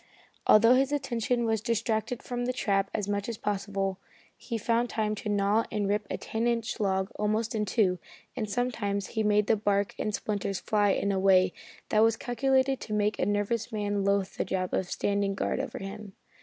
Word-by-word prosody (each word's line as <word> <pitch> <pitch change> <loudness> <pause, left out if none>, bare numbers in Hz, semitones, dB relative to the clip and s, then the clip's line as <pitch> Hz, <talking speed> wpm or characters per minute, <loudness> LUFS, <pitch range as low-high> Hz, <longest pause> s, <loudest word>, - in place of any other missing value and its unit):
Although 230 +3 +7
his 270 +2 +3
attention 245 -4 0
was 220 -2 +1
distracted 225 +1 -1
from 245 0 -3
the 250 - -1
trap 195 -5 0
as 205 -2 -2
much 205 +1 -2
as 230 - -4
possible, 195 -2 -2 0.4
he 235 - -5
found 235 +2 +1
time 215 -1 -1
to 210 0 -5
gnaw 205 +2 +2
and 205 -2 -1
rip 205 0 0
a - - -2
ten 225 +2 -2
inch 235 -1 -1
log 190 0 0
almost 215 +2 0
in 215 -1 0
two, 185 -3 +1 0.4
and 215 -4 -3
sometimes 205 -4 -1
he 220 - -1
made 210 -1 +3
the 225 - +3
bark 205 -1 0
and 210 -1 -1
splinters 200 -2 -2
fly 205 -1 +2
in 200 +1 +1
a 190 - 0
way 185 -1 +4 0.4
that 215 - +3
was 225 0 +4
calculated 265 +2 +1
to 215 - -6
make 210 0 +1
a - - +1
nervous 205 +3 -1
man 205 -2 -1
loathe 200 -1 +1
the - - +1
job 185 -1 -2
of 185 - -1
standing 200 -1 0
guard - - -1
over 265 -3 -4
him. 200 0 -7
210 Hz, 195 wpm, -28 LUFS, 200-230 Hz, 0.4 s, Although